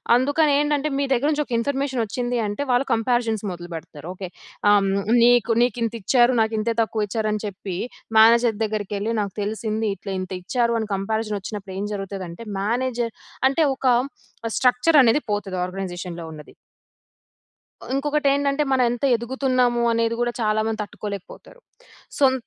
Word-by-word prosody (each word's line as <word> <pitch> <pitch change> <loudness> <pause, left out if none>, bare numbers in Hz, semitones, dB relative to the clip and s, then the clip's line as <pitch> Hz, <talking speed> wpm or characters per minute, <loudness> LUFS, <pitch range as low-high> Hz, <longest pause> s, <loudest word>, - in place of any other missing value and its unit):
అందుకని 285 +4 +3
ఏంటంటే, 295 0 +1
మీ 280 - +1
దగ్గర 265 +4 +1
నుంచి 300 0 0
ఒక 250 - -7
ఇన్ఫర్మేషన్ 270 -1 -1
వచ్చింది 245 +3 -2
అంటే, 205 +5 -4
వాళ్ళు 245 +2 +2
కంపారిజన్స్ 225 -2 0
మొదలు 175 0 -8
పెడతారు. 155 -1 -9
ఓకే. 185 -1 -6 0.4
ఆహ్, 205 -1 +5
హ్మ్, 195 +2 0
నీకు 240 -1 +4
నీకింత 235 -1 -1
ఇచ్చారు. 240 +5 +4
నాకింతే 220 +1 0
తక్కువ 220 -1 -1
ఇచ్చారని 215 0 -1
చెప్పి, 195 -2 -5 0.4
మేనేజర్ 230 0 +5
దగ్గరికెళ్ళి 210 0 -2
నాకు 200 -2 -4
తెలిసింది, 220 +1 -2
ఇట్లా 195 - -6
ఇంత 185 - -7
ఇచ్చారు 235 +3 +1
అని 220 -1 -4
కంపారిజన్ 215 +2 -2
వచ్చినప్పుడు 195 -1 -7
ఏం 200 - -2
జరుగుతది 195 -1 -5
అంటే, 170 +7 -9 0.2
మేనేజర్ 235 +2 -1 0.4
అంటే 300 +4 0
ఒక 270 - -8 0.7
స్ట్రక్చర్ 255 +5 +3
అనేది 240 +4 +4
పోతది 200 -2 -2
ఆర్గనైజేషన్‌లో 180 -2 -6
ఉన్నది. 150 -1 -12 1.4
ఉంకొకటేంటంటే, 280 0 +1
మనం 260 -1 +3
ఎంత 240 +1 -5
ఎదుగుతున్నాము 250 0 +1
అనేది 230 0 +1
కూడా, 240 0 +1
చాలా 215 0 +1
మంది 220 -1 -2
తట్టుకోలేకపోతారు. 205 - -8 0.6
సొం 270 -2 +5
225 Hz, 145 wpm, -23 LUFS, 205-250 Hz, 1.4 s, ఆహ్